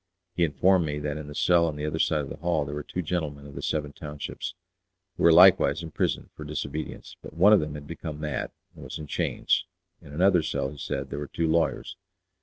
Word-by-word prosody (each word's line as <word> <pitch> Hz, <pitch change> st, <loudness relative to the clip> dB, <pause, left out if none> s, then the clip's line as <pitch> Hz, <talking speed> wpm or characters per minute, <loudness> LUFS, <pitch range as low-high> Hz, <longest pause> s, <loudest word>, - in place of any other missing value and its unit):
He 85 Hz, -, +1 dB
informed 90 Hz, +3 st, +3 dB
me 75 Hz, 0 st, -2 dB
that 75 Hz, 0 st, -3 dB
in 75 Hz, -1 st, -7 dB
the 75 Hz, -, -9 dB
cell 85 Hz, 0 st, +4 dB
on 80 Hz, -, -3 dB
the 75 Hz, 0 st, -4 dB
other 75 Hz, +1 st, -2 dB
side 80 Hz, -2 st, +2 dB
of 70 Hz, -, -6 dB
the -, -, -7 dB
hall 85 Hz, -3 st, 0 dB
there 70 Hz, -, -6 dB
were 75 Hz, -, -3 dB
two 90 Hz, +5 st, -4 dB
gentlemen 75 Hz, -4 st, -3 dB
of 70 Hz, -, -11 dB
the -, -, -6 dB
"Seven 75 Hz, -2 st, -2 dB
Townships," 75 Hz, +5 st, -6 dB, 0.6 s
who -, -, -7 dB
were 85 Hz, -, +7 dB
likewise 85 Hz, -3 st, +6 dB
imprisoned 80 Hz, -, -2 dB
for -, -, -8 dB
disobedience, 75 Hz, +2 st, -5 dB
but -, -, -11 dB
one 100 Hz, +6 st, +6 dB
of 105 Hz, -, +7 dB
them 75 Hz, -1 st, -4 dB
had 75 Hz, -1 st, -8 dB
become 80 Hz, -1 st, -6 dB
mad, 75 Hz, -4 st, -3 dB, 0.2 s
and -, -, -12 dB
was -, -, -6 dB
in 75 Hz, -, -7 dB
chains; 75 Hz, -, 0 dB, 0.4 s
in 70 Hz, -, -13 dB
another 90 Hz, +3 st, +4 dB
cell, 70 Hz, -3 st, -2 dB
he 75 Hz, -, -11 dB
said, -, -, -4 dB
there 70 Hz, -, -3 dB
were 75 Hz, -, -5 dB
two 85 Hz, -, -2 dB
lawyers. 80 Hz, +1 st, 0 dB
75 Hz, 230 wpm, -27 LUFS, 75-85 Hz, 0.6 s, were